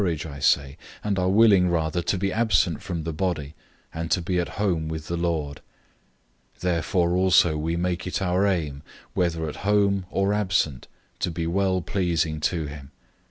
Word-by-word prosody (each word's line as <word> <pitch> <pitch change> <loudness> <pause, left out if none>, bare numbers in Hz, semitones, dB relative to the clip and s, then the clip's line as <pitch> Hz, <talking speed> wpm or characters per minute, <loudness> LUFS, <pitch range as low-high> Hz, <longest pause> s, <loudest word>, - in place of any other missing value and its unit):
005:008 - - +2
We - - +2
are - - 0
of - - -4
good - - -4
courage, 75 -3 -7
I - - -8
say, 70 +1 +2 0.3
and 100 -2 0
are 90 0 +1
willing 100 -3 +5
rather 80 0 0
to 90 +3 0
be 95 +1 -1
absent 105 -7 +2
from 85 -3 -4
the 80 0 -3
body, 80 -4 -2 0.4
and 80 0 -4
to 95 - +2
be 90 +1 -1
at 90 - -1
home 90 -6 -1
with 80 -1 -5
the 85 - -3
Lord. 80 -4 -2 1.0
005:009 - - -31
Therefore 85 0 +1
also 90 -3 +4
we 80 +2 -1
make 90 +1 -2
it 90 - -2
our 95 +1 +1
aim, 75 -7 -1 0.3
whether 85 -2 0
at 75 - -6
home 100 -2 +1
or 100 +1 +1
absent, 90 -10 0 0.3
to - - 0
be 85 0 -3
well 95 +2 +1
pleasing 85 -4 -1
to 80 +1 -1
him. 70 -2 -9
85 Hz, 205 wpm, -25 LUFS, 80-95 Hz, 1.0 s, willing